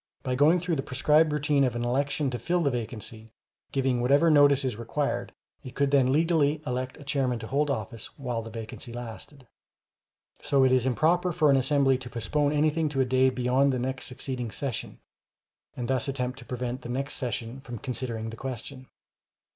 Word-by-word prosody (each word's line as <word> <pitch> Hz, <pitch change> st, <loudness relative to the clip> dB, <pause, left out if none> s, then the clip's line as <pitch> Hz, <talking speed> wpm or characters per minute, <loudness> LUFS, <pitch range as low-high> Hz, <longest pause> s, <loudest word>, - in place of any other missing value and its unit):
By 130 Hz, -, -1 dB
going 150 Hz, +7 st, +4 dB
through 170 Hz, -2 st, -1 dB
the -, -, 0 dB
prescribed 150 Hz, +4 st, +3 dB
routine 150 Hz, -1 st, +2 dB
of 125 Hz, -3 st, +1 dB
an 120 Hz, 0 st, -2 dB
election 140 Hz, +2 st, 0 dB
to 120 Hz, -, -3 dB
fill 175 Hz, 0 st, 0 dB
the 140 Hz, -, +2 dB
vacancy, 115 Hz, -2 st, -6 dB, 0.4 s
giving 130 Hz, -3 st, +1 dB
whatever 140 Hz, +6 st, +4 dB
notice 145 Hz, -2 st, +5 dB
is 125 Hz, -4 st, -1 dB
required, 120 Hz, +6 st, -2 dB, 0.3 s
it 130 Hz, -, -9 dB
could 140 Hz, 0 st, +1 dB
then 135 Hz, -2 st, +4 dB
legally 155 Hz, -1 st, +2 dB
elect 130 Hz, -1 st, -3 dB
a -, -, -11 dB
chairman 135 Hz, -3 st, 0 dB
to 115 Hz, -, -7 dB
hold 145 Hz, +5 st, 0 dB
office 115 Hz, -4 st, -4 dB
while 125 Hz, -4 st, -3 dB
the 115 Hz, -, -8 dB
vacancy 115 Hz, +2 st, -7 dB
lasted. 120 Hz, +3 st, -8 dB, 1.0 s
So 140 Hz, -2 st, +3 dB
it 130 Hz, -, +4 dB
is 130 Hz, 0 st, +3 dB
improper 175 Hz, +7 st, +2 dB
for 155 Hz, -3 st, +3 dB
an -, -, +5 dB
assembly 135 Hz, 0 st, +3 dB
to 125 Hz, -2 st, -8 dB
postpone 145 Hz, +6 st, 0 dB
anything 155 Hz, +1 st, +1 dB
to 135 Hz, -2 st, 0 dB
a -, -, +3 dB
day 130 Hz, +1 st, +3 dB
beyond 130 Hz, +2 st, +2 dB
the 130 Hz, -, -1 dB
next 130 Hz, +2 st, -2 dB
succeeding 125 Hz, -2 st, -4 dB
session, 130 Hz, +1 st, -5 dB, 0.8 s
and 120 Hz, -1 st, -3 dB
thus 130 Hz, -1 st, 0 dB
attempt 130 Hz, -1 st, -3 dB
to 120 Hz, -, -12 dB
prevent 125 Hz, +1 st, -4 dB
the 120 Hz, -, -8 dB
next 135 Hz, +3 st, -2 dB
session 120 Hz, 0 st, -3 dB
from 120 Hz, -3 st, -7 dB
considering 115 Hz, -2 st, -4 dB
the 115 Hz, -, -9 dB
question. 130 Hz, +1 st, -7 dB
130 Hz, 190 wpm, -27 LUFS, 125-145 Hz, 1.0 s, notice